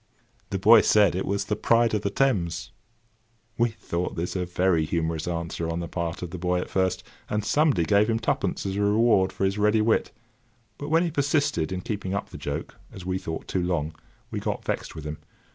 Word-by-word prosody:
The 100 - -1
boy 110 +4 +7
said 105 -4 +4
it 95 - -2
was 100 0 -1
The 105 - -1
Pride 115 +2 +3
of 105 - +1
the 100 - -1
Thames. 100 -9 0 0.8
We 120 +1 +2
thought 90 -5 -4
this 85 +3 -3
a 90 -1 -1
very 90 -2 +2
humorous 80 0 -2
answer 85 -1 -3
on 85 +1 -2
the 85 - -4
part 85 +2 -4
of 90 - -5
the 90 - -6
boy 90 0 +1
at - - -5
first, 95 -1 0 0.3
and 105 0 -1
somebody 145 - +3
gave 105 +5 +3
him 115 - +2
twopence 115 - -1
as 95 0 -2
a - - 0
reward 105 -2 +3
for 95 - -1
his 95 +2 0
ready 105 +1 +3
wit; 110 +1 +2 0.7
but 145 - -5
when 165 +2 +4
he 170 - -1
persisted 140 - +1
in 90 -1 -3
keeping 100 -2 -3
up 100 - -3
the - - -8
joke, - - -5
as 95 - -10
we 95 0 -1
thought, 80 -2 -6
too 95 - -1
long, 85 -3 -1 0.4
we 110 - -2
got - - -3
vexed - - -3
with 80 -2 -8
him. 75 0 -5
95 Hz, 215 wpm, -26 LUFS, 85-110 Hz, 0.8 s, boy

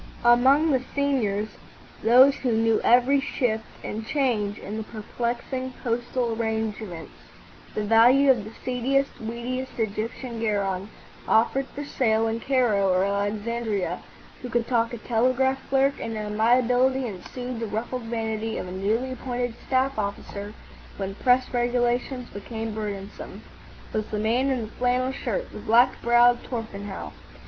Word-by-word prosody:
Among 265 +6 +5
the 260 -2 +2
seniors—those 250 0 +2
who 250 -3 0
knew 225 0 +2
every 250 +4 +5
shift 240 -5 -1 0.2
and 220 +1 -4
change 220 -6 0
in 210 +2 -6
the 220 - -3
perplexing 240 +4 -4
postal 240 0 -1
arrangements, 220 - -3 0.6
the 215 - -1
value 245 +6 +6
of 240 -5 +1
the 215 - -9
seediest, 265 +2 +1
weediest 240 +3 -4
Egyptian 225 +2 -3
garron 200 -3 -1 0.4
offered 265 +4 +3
for 290 - -7
sale 225 -5 +1
in 225 +1 -1
Cairo 230 -7 +2
or 185 +1 +3
Alexandria, 205 -2 -1 0.4
who 250 - -6
could 235 0 0
talk 230 -2 +1
a 240 - -5
telegraph 255 +4 +1
clerk 275 +1 +2
into 225 -1 -4
amiability 245 +4 +2
and 190 -5 -7
soothe 250 -1 -6
the 230 - -3
ruffled 230 +4 -4
vanity 225 -1 -2
of - - -4
a - - -7
newly 215 +7 -1
appointed 245 -1 -3
staff 260 -2 +1
officer 205 0 -5 0.4
when 195 -1 -3
press 250 +4 +2
regulations 245 +1 0
became 220 +2 -5
burdensome—was 210 +1 -7
the 215 - -3
man 235 +6 +1
in 260 -3 0
the 220 - -4
flannel 250 +1 +1
shirt, - - -3
the - - -8
black 240 +3 +3
browed 240 +1 +5
Torpenhow. 205 -5 -6
235 Hz, 140 wpm, -25 LUFS, 215-255 Hz, 0.6 s, value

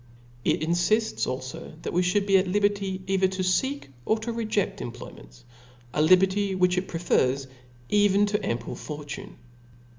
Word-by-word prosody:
It - - +1
infifts 175 +7 +1
alfo 130 +5 -6
that - - -4
we 180 - +3
fhould 185 +3 +1
be 195 -1 +3
at 185 - -1
liberty 200 -1 0
either 190 0 +2
to 190 0 -3
feek 265 - 0
or 220 - +2
toVejeft 215 -3 -2
employments; - - -10 0.5
a 150 - +1
liberty 190 +4 +4
which 180 -1 +3
it 185 +1 -1
prefers 140 -5 +1 0.4
even 205 -1 +4
to 205 0 0
an - - -6
ample 120 0 -6
fortune. 150 -1 -7
185 Hz, 150 wpm, -26 LUFS, 165-205 Hz, 0.5 s, liberty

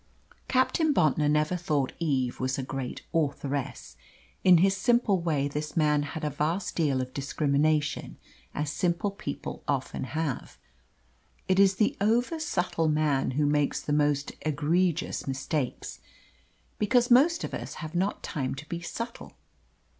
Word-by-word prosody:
Captain 290 +4 +2
Bontnor 150 -1 +3
never 150 +3 +2
thought 150 -6 -1
Eve 135 -7 0
was 130 0 -1
a 135 - -2
great 130 -1 -5
authoress. 140 - -2 0.5
In 180 -2 +7
his 190 +3 +4
simple 210 -2 +2
way 150 -4 0
this 150 +3 -5
man 150 -2 +3
had 150 +2 -5
a 150 - -1
vast 160 +7 -1
deal 140 -6 +1
of 130 0 -6
discrimination, 145 +1 0 0.4
as 150 0 -1
simple 175 +4 0
people 145 -7 -6
often 135 -2 -2
have. 155 -1 -3 0.9
It 185 0 +3
is 195 -1 +5
the 210 +2 +2
oversubtle 215 - +1
man 150 -3 +1
who 150 - +3
makes 145 0 +1
the 145 - -3
most 145 -1 +1
egregious 160 +3 0
mistakes, 135 0 -3 0.8
because 245 +3 +3
most 315 +7 +5
of - - -5
us - - -5
have 155 -1 -7
not 190 +4 -1
time 135 -3 -3
to 150 +2 -9
be 170 +1 -4
subtle. 230 +7 -6
155 Hz, 140 wpm, -28 LUFS, 145-185 Hz, 0.9 s, In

